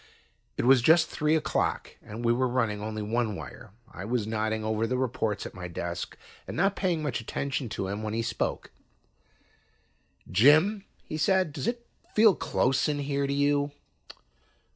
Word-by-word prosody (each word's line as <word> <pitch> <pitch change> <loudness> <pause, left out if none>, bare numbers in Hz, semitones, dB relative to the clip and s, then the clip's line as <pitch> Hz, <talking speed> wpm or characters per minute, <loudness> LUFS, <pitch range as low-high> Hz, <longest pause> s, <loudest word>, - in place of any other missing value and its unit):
It - - 0
was 130 -1 +6
just 160 +5 +5
three 150 +1 +1
o'clock 155 - -1
and 115 +3 -7
we 115 - +4
were 130 +2 +1
running 115 -4 0
only 110 0 -4
one 110 0 -1
wire. 120 +3 -9 0.2
I 95 - -7
was 115 +1 -1
nodding 110 0 -1
over 110 +1 0
the 125 - -1
reports 120 -5 -1
at - - -7
my 90 -1 -7
desk 85 0 -5 0.3
and - - -6
not 195 +3 +2
paying 175 -5 0
much 130 -6 -2
attention 135 +2 -3
to 95 - -3
him, 100 +2 -4
when 110 0 -3
he 115 - 0
spoke. 115 - -3 1.6
"Jim," 155 - +5 0.2
he 155 - -5
said, 185 0 +2
"does 140 -4 -4
it 240 0 -2 0.3
feel 215 -1 +7
close 130 -4 +1
in 150 - 0
here 140 0 -1
to 140 - -1
you?" 145 0 +1
125 Hz, 170 wpm, -28 LUFS, 110-150 Hz, 1.6 s, feel